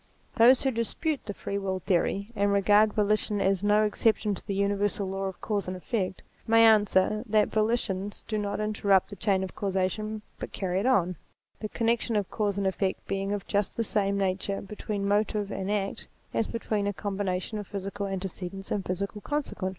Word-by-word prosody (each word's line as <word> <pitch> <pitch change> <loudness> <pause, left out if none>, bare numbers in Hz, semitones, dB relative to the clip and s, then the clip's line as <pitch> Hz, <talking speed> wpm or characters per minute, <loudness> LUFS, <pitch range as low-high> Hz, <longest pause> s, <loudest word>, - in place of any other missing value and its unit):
Those 245 +3 +6
who 265 - +2
dispute 255 +6 -2
the 205 - -3
Free 200 - -3
Will 190 -1 -2
theory, 195 +3 0
and 200 -1 +2
regard, 205 +2 +5
volition 210 0 +1
as 195 0 +1
no 210 +1 +4
exception 215 0 +2
to 190 - -8
the 200 - -1
Universal 200 0 0
law 195 +1 -3
of 190 -1 -5
Cause 205 -3 -1
and 185 0 -3
Effect, 190 -1 -3 0.2
may 225 0 +6
answer, 215 -1 +4
that 215 -1 +3
volitions 215 -3 -1
do 215 -1 -1
not 205 0 -2
interrupt 205 -2 +2
the - - -6
chain 195 -1 +1
of 190 - -5
causation, 205 +2 -1 0.2
but - - -6
carry 185 -1 -1
it 215 - 0
on, 185 -9 +2 0.4
the 215 - -4
connection 230 0 0
of 205 -2 0
cause 205 -2 0
and 200 - 0
effect 190 0 -1
being 195 0 -2
of 205 -1 -2
just 205 -1 -1
the 230 - +1
same 200 -2 0
nature 195 0 -1
be 200 +2 -9
tween 205 -2 -3
motive 205 0 +1
and 190 +1 -3
act 200 -1 -1 0.3
as 225 - +1
between 215 -3 -1
a 205 - 0
combination 200 0 -2
of 205 - -7
physical 200 0 -4
antecedents 195 0 -4
and 200 - 0
a - - -11
physical 200 +3 -3
consequent. 290 -10 -2
200 Hz, 195 wpm, -28 LUFS, 195-215 Hz, 0.4 s, Those